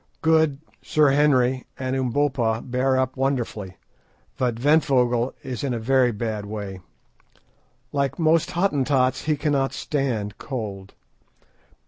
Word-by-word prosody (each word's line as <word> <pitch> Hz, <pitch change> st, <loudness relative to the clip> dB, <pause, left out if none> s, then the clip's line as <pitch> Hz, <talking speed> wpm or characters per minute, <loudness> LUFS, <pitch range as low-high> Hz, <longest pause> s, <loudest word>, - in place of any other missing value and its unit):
Good, 160 Hz, -3 st, +3 dB, 0.2 s
Sir 150 Hz, -2 st, +3 dB
Henry, 130 Hz, -3 st, +2 dB
and 130 Hz, 0 st, -2 dB
Umbopa 125 Hz, -3 st, 0 dB
bear 130 Hz, +1 st, +1 dB
up 130 Hz, -1 st, 0 dB
wonderfully, 120 Hz, -8 st, -2 dB, 0.6 s
but 125 Hz, -3 st, 0 dB
Ventvögel 125 Hz, -3 st, +2 dB
is 130 Hz, -3 st, -5 dB
in 130 Hz, -3 st, -1 dB
a -, -, -3 dB
very 125 Hz, +1 st, +3 dB
bad 105 Hz, -2 st, -4 dB
way. 100 Hz, -3 st, -6 dB, 1.1 s
Like 140 Hz, -1 st, -1 dB
most 160 Hz, -1 st, +2 dB
Hottentots, 140 Hz, -8 st, +1 dB
he 155 Hz, -1 st, +1 dB
cannot 140 Hz, -2 st, 0 dB
stand 120 Hz, -8 st, -2 dB
cold. 100 Hz, -7 st, -6 dB
130 Hz, 115 wpm, -23 LUFS, 115-140 Hz, 1.1 s, Good